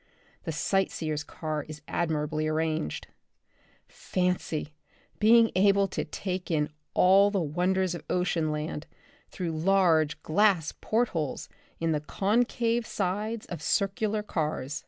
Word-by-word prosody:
The 165 Hz, -, -2 dB
sight 195 Hz, +5 st, +1 dB
seers' 155 Hz, -2 st, -3 dB
car 155 Hz, 0 st, -4 dB
is 150 Hz, -1 st, -9 dB
admirably 155 Hz, -2 st, -1 dB
arranged. 155 Hz, -, -1 dB, 0.8 s
Fancy 180 Hz, -4 st, -2 dB, 0.5 s
being 225 Hz, +1 st, +6 dB
able 200 Hz, +1 st, +4 dB
to -, -, -2 dB
take 185 Hz, -2 st, -4 dB
in 150 Hz, -3 st, +1 dB, 0.3 s
all 195 Hz, +2 st, +6 dB
the 200 Hz, -1 st, 0 dB
wonders 180 Hz, +3 st, 0 dB
of 175 Hz, -, -6 dB
ocean 175 Hz, -3 st, 0 dB
land 150 Hz, 0 st, -4 dB, 0.4 s
through 175 Hz, -3 st, -3 dB
large 160 Hz, -2 st, +2 dB
glass 185 Hz, -2 st, +3 dB
port 235 Hz, +2 st, +1 dB
holes 155 Hz, -6 st, -3 dB, 0.3 s
in 165 Hz, 0 st, 0 dB
the 150 Hz, -, +1 dB
concave 230 Hz, +6 st, 0 dB
sides 210 Hz, +4 st, -2 dB
of 175 Hz, -4 st, -7 dB
circular 210 Hz, +4 st, 0 dB
cars. 155 Hz, -6 st, -2 dB
175 Hz, 125 wpm, -28 LUFS, 155-200 Hz, 0.8 s, being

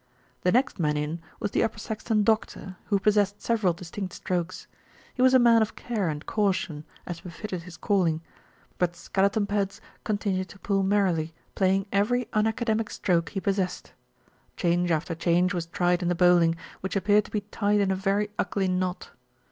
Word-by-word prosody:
The 180 Hz, -, +2 dB
next 255 Hz, -2 st, +1 dB
man 150 Hz, -2 st, +1 dB
in 150 Hz, +3 st, -3 dB, 0.2 s
was 205 Hz, -, -2 dB
the -, -, +1 dB
Upper 220 Hz, -, 0 dB
Saxton 215 Hz, 0 st, -1 dB
doctor, 210 Hz, -3 st, 0 dB
who 205 Hz, -, +2 dB
possessed 205 Hz, 0 st, +2 dB
several 220 Hz, -6 st, +1 dB
distinct 180 Hz, +2 st, -6 dB
strokes. 180 Hz, 0 st, -3 dB, 0.5 s
He 250 Hz, -, -3 dB
was 260 Hz, 0 st, +6 dB
a -, -, +10 dB
man 235 Hz, -2 st, +6 dB
of 220 Hz, -, -1 dB
care 215 Hz, -8 st, -2 dB
and 150 Hz, 0 st, -5 dB
caution, 185 Hz, -7 st, -1 dB, 0.2 s
as 175 Hz, -2 st, -6 dB
befitted 180 Hz, +1 st, -6 dB
his 170 Hz, -1 st, -11 dB
calling; 170 Hz, -6 st, +1 dB, 0.6 s
but 175 Hz, -1 st, +1 dB
Skeleton 200 Hz, +4 st, +1 dB
Pads 200 Hz, -1 st, -1 dB, 0.2 s
continued 200 Hz, -3 st, -1 dB
to -, -, -12 dB
pull 195 Hz, -1 st, 0 dB
merrily, 185 Hz, -5 st, +1 dB, 0.2 s
playing 190 Hz, 0 st, +2 dB
every 240 Hz, +5 st, +2 dB
unaca 220 Hz, +2 st, +1 dB
demic 220 Hz, -1 st, 0 dB
stroke 170 Hz, -3 st, 0 dB
he 195 Hz, -, -3 dB
possessed. 190 Hz, -2 st, -2 dB, 0.6 s
Change 175 Hz, 0 st, +1 dB
after 165 Hz, +1 st, 0 dB
change 175 Hz, +3 st, +2 dB
was 170 Hz, -2 st, -3 dB
tried 175 Hz, +1 st, +1 dB
in 175 Hz, -, -1 dB
the 175 Hz, -, +1 dB
bowling, 175 Hz, -2 st, +5 dB, 0.2 s
which 190 Hz, +1 st, -4 dB
appeared 205 Hz, +1 st, +3 dB
to -, -, -13 dB
be 210 Hz, -, -1 dB
tied 205 Hz, 0 st, 0 dB
in 195 Hz, -1 st, +2 dB
a -, -, +1 dB
very 200 Hz, +2 st, 0 dB
ugly 195 Hz, -2 st, 0 dB
knot. 185 Hz, 0 st, -2 dB
195 Hz, 180 wpm, -27 LUFS, 175-210 Hz, 0.6 s, a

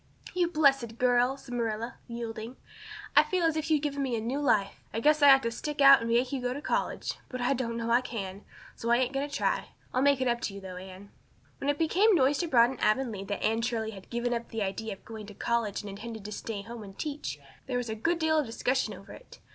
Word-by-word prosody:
"You 360 Hz, -1 st, +2 dB
blessed 275 Hz, -8 st, +2 dB
girl!" 250 Hz, +2 st, +3 dB
said 255 Hz, -2 st, -10 dB
Marilla, 230 Hz, -1 st, -2 dB
yielding. 235 Hz, 0 st, -6 dB, 0.6 s
"I -, -, +9 dB
feel 365 Hz, -2 st, -1 dB
as 325 Hz, -1 st, +2 dB
if 315 Hz, 0 st, -2 dB
you'd 305 Hz, -2 st, +2 dB
given 285 Hz, -1 st, -1 dB
me 250 Hz, -4 st, -1 dB
new 240 Hz, +6 st, -2 dB
life. 215 Hz, -8 st, +1 dB
I 225 Hz, -, -2 dB
guess 300 Hz, +5 st, +3 dB
I 285 Hz, -1 st, +9 dB
ought 270 Hz, 0 st, +6 dB
to 230 Hz, -, -1 dB
stick 295 Hz, +5 st, -5 dB
out 275 Hz, -2 st, +8 dB
and 230 Hz, -, -3 dB
make 240 Hz, +3 st, +2 dB
you 270 Hz, -2 st, -2 dB
go 250 Hz, 0 st, -1 dB
to -, -, -4 dB
college -, -, -1 dB, 0.2 s
but 255 Hz, -, -5 dB
I 245 Hz, +2 st, +2 dB
know 230 Hz, -2 st, -2 dB
I 240 Hz, +2 st, +5 dB
can't, 200 Hz, -6 st, -5 dB, 0.3 s
so 235 Hz, -, -4 dB
I 235 Hz, -, +5 dB
ain't 255 Hz, +1 st, 0 dB
going 275 Hz, +2 st, -1 dB
to 285 Hz, -, -6 dB
try. -, -, 0 dB, 0.3 s
I'll 255 Hz, -, +2 dB
make 280 Hz, -1 st, +4 dB
it 260 Hz, -, +1 dB
up 240 Hz, 0 st, 0 dB
to 200 Hz, -, -3 dB
you -, -, -6 dB
though, 185 Hz, -2 st, -8 dB
Anne." 190 Hz, +2 st, -10 dB, 0.5 s
When 275 Hz, -, -1 dB
it 290 Hz, -, +1 dB
became 380 Hz, +7 st, +4 dB
noised 280 Hz, 0 st, +3 dB
abroad 250 Hz, -8 st, +4 dB
in 265 Hz, -, -8 dB
Avonlea 215 Hz, -3 st, 0 dB
that 205 Hz, 0 st, -4 dB
Anne 225 Hz, +1 st, +2 dB
Shirley 225 Hz, -2 st, -1 dB
had 195 Hz, -3 st, -12 dB
given 240 Hz, +1 st, -1 dB
up 235 Hz, 0 st, -3 dB
the 225 Hz, -2 st, -2 dB
idea 200 Hz, +3 st, -3 dB
of 195 Hz, -, -15 dB
going 220 Hz, -2 st, -8 dB
to 205 Hz, -, -11 dB
college 230 Hz, -3 st, -1 dB
and 205 Hz, -, -8 dB
intended 220 Hz, +1 st, -8 dB
to 210 Hz, -, -6 dB
stay 210 Hz, -1 st, -5 dB
home 235 Hz, +1 st, -8 dB
and 195 Hz, -2 st, -11 dB
teach 300 Hz, -1 st, -4 dB, 0.3 s
there 250 Hz, -2 st, -1 dB
was 245 Hz, -1 st, -2 dB
a -, -, -1 dB
good 330 Hz, +11 st, 0 dB
deal 315 Hz, -1 st, +2 dB
of 295 Hz, -, -1 dB
discussion 235 Hz, -1 st, -1 dB
over 195 Hz, +1 st, -13 dB
it. -, -, -14 dB
240 Hz, 250 wpm, -29 LUFS, 220-275 Hz, 0.6 s, I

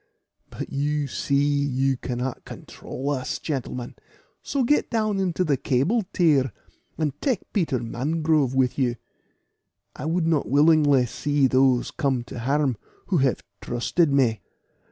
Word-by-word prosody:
But -, -, -7 dB
you 145 Hz, +1 st, 0 dB
see 140 Hz, +1 st, 0 dB
you 140 Hz, -2 st, +1 dB
cannot 125 Hz, 0 st, -4 dB
control 140 Hz, +3 st, -6 dB
us, 130 Hz, -2 st, -2 dB
gentlemen; 125 Hz, -4 st, -4 dB, 0.5 s
so 275 Hz, -2 st, -1 dB
get 295 Hz, +5 st, +2 dB
down 215 Hz, -4 st, 0 dB
into 185 Hz, -1 st, 0 dB
the 145 Hz, -6 st, +1 dB
cable 170 Hz, -, +1 dB
tier, 145 Hz, -8 st, +3 dB, 0.5 s
and 155 Hz, -3 st, -1 dB
take 255 Hz, -8 st, -2 dB
Peter 165 Hz, -, +1 dB
Mangrove 145 Hz, +3 st, 0 dB
with 130 Hz, 0 st, +1 dB
you. 125 Hz, -3 st, +1 dB, 1.0 s
I -, -, -6 dB
would 165 Hz, +1 st, 0 dB
not 160 Hz, -3 st, +1 dB
willingly 145 Hz, -2 st, +4 dB
see 145 Hz, +3 st, 0 dB
those 130 Hz, -1 st, +3 dB
come 130 Hz, -4 st, -1 dB
to 120 Hz, -, -8 dB
harm 135 Hz, 0 st, 0 dB, 0.3 s
who 185 Hz, -, +2 dB
have 135 Hz, -3 st, +1 dB, 0.2 s
trusted 140 Hz, +6 st, 0 dB
me." 125 Hz, -5 st, +2 dB
140 Hz, 135 wpm, -24 LUFS, 130-160 Hz, 1.0 s, willingly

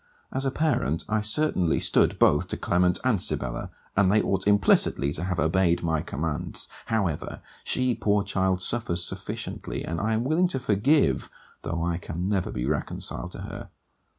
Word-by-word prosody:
As 135 Hz, -, -1 dB
a -, -, +2 dB
parent 135 Hz, -, 0 dB
I 110 Hz, 0 st, +1 dB
certainly 105 Hz, -, +1 dB
stood -, -, +2 dB
both 75 Hz, -, +3 dB
to -, -, -4 dB
Clement 90 Hz, 0 st, +2 dB
and 120 Hz, -8 st, +2 dB
Sibella, -, -, 0 dB, 0.3 s
and 95 Hz, -2 st, +4 dB
they 105 Hz, -, +4 dB
ought 95 Hz, -1 st, -1 dB
implicitly 90 Hz, -8 st, +3 dB
to 80 Hz, -, -3 dB
have 90 Hz, -2 st, -2 dB
obeyed 85 Hz, +1 st, +2 dB
my 80 Hz, -2 st, 0 dB
commands. 75 Hz, +1 st, -3 dB, 0.2 s
However, 95 Hz, -9 st, -1 dB, 0.2 s
she 130 Hz, -1 st, +2 dB
poor 105 Hz, -2 st, +1 dB
child 95 Hz, -2 st, 0 dB
suffers 90 Hz, -7 st, +1 dB
sufficiently, -, -, -5 dB
and 85 Hz, 0 st, -3 dB
I 110 Hz, +1 st, 0 dB
am 110 Hz, -, 0 dB
willing 160 Hz, +7 st, +2 dB
to 135 Hz, -6 st, -2 dB
forgive 130 Hz, +6 st, +2 dB, 0.3 s
though 85 Hz, +1 st, -3 dB
I 85 Hz, -1 st, -1 dB
can 85 Hz, +1 st, -4 dB
never 100 Hz, -3 st, 0 dB
be 60 Hz, 0 st, -3 dB
reconciled 75 Hz, +4 st, -3 dB
to -, -, -7 dB
her. -, -, -8 dB
95 Hz, 170 wpm, -26 LUFS, 85-110 Hz, 0.3 s, and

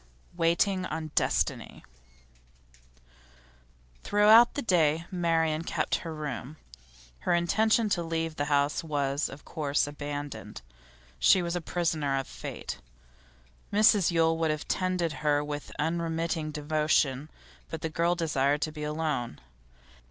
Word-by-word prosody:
WAITING 180 Hz, +3 st, +1 dB
ON 155 Hz, -1 st, -5 dB
DESTINY -, -, -1 dB, 2.2 s
Throughout 215 Hz, +3 st, +6 dB
the 285 Hz, -, -2 dB
day 165 Hz, -5 st, +2 dB
Marian 165 Hz, -3 st, +1 dB
kept -, -, -2 dB
her 165 Hz, -, -7 dB
room. 150 Hz, -1 st, -6 dB, 0.6 s
Her 175 Hz, -, +1 dB
intention 215 Hz, +6 st, +2 dB
to 175 Hz, -, +1 dB
leave 165 Hz, -1 st, -2 dB
the 145 Hz, -, -1 dB
house 145 Hz, +1 st, +1 dB
was, 145 Hz, -2 st, -1 dB
of 140 Hz, +2 st, -11 dB
course, 150 Hz, -3 st, 0 dB
abandoned; 145 Hz, -, -6 dB, 0.6 s
she 180 Hz, -, +5 dB
was 170 Hz, 0 st, -2 dB
the 175 Hz, -, -2 dB
prisoner 155 Hz, -5 st, -1 dB
of 135 Hz, -, -2 dB
fate. -, -, -7 dB, 0.9 s
Mrs 205 Hz, -3 st, +5 dB
Yule 165 Hz, -1 st, +2 dB
would 165 Hz, -1 st, +1 dB
have 155 Hz, -1 st, -3 dB
tended 180 Hz, -3 st, 0 dB
her 145 Hz, -1 st, +2 dB
with 145 Hz, 0 st, -6 dB
unremitting 165 Hz, -1 st, -1 dB
devotion, 150 Hz, -2 st, 0 dB, 0.4 s
but 160 Hz, -, -6 dB
the -, -, -1 dB
girl 170 Hz, +2 st, +1 dB
desired 145 Hz, -3 st, +1 dB
to 155 Hz, -, -2 dB
be 150 Hz, -1 st, -9 dB
alone. 150 Hz, -, -2 dB
160 Hz, 125 wpm, -28 LUFS, 145-170 Hz, 2.2 s, Throughout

